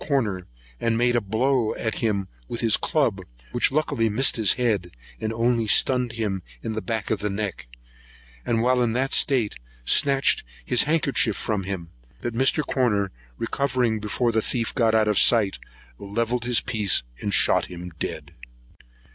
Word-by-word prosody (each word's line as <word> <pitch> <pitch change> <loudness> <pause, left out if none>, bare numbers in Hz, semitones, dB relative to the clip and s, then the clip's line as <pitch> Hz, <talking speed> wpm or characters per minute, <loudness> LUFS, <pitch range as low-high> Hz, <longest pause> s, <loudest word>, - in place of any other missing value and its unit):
Corner, 105 - -1 0.3
and 115 -1 0
made 120 +1 +2
a 120 - +2
blow 115 +3 0
at 110 -2 -3
him 100 -4 -1 0.2
with 120 - -4
his 115 -3 +5
club, 115 -11 0 0.3
which 120 - +2
luckily 140 -6 0
missed 125 +6 +3
his 110 -4 +3
head, 110 -8 0 0.3
and 110 0 -2
only 115 0 +1
stunned 125 +2 +3
him 105 -5 -2 0.2
in 110 - -3
the 110 - -3
back 110 -2 -3
of - - 0
the 105 - -2
neck; 100 - -4 0.8
and, 115 -1 0
while 125 0 +2
in 115 -2 +1
that 130 +2 0
state, 125 -7 +2 0.3
snatched 135 - +3 0.2
his 125 - +3
handkerchief 140 -9 +2
from 105 -4 -2
him; 90 -4 -5 0.3
but 120 - -4
Mr. 135 +5 +2
Corner 105 -7 0 0.3
recovering 125 -2 0
before 110 +3 0
the 110 0 +1
thief 115 0 -2
got 115 -2 +2
out 110 -1 +3
of 105 -2 +3
sight, 110 -5 +4 0.4
levelled 115 +4 -2
his 120 -1 +3
piece 105 - +1 0.2
and 105 - -3
shot - - +3
him 90 0 -8
dead. - - -5
115 Hz, 165 wpm, -24 LUFS, 105-125 Hz, 0.8 s, his